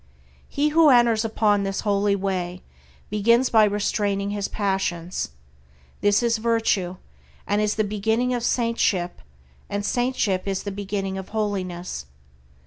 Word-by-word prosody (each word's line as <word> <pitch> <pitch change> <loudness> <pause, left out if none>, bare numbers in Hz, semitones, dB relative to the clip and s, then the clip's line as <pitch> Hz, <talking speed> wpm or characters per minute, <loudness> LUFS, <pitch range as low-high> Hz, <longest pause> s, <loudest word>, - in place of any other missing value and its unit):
He 295 +2 +1
who 315 0 +5
enters 240 -3 +4
upon 215 -2 +2
this 195 0 -2
holy 200 -1 +1
way 185 -2 -3 0.5
begins 235 +5 +3
by 220 -2 +6
restraining 200 -1 0
his 205 -1 -2
passions. 190 -4 -2 0.7
This 205 +3 +3
is 230 -1 +1
virtue, 220 -5 +1 0.5
and 205 +1 +1
is 210 0 +1
the 215 - +1
beginning 220 +4 0
of 245 - -1
saintship, 230 -7 0 0.5
and 205 0 -2
saintship 240 -7 0
is 195 -1 -2
the 200 - -4
beginning 195 -1 -3
of 190 - -9
holiness. 185 - -3
205 Hz, 135 wpm, -24 LUFS, 195-225 Hz, 0.7 s, by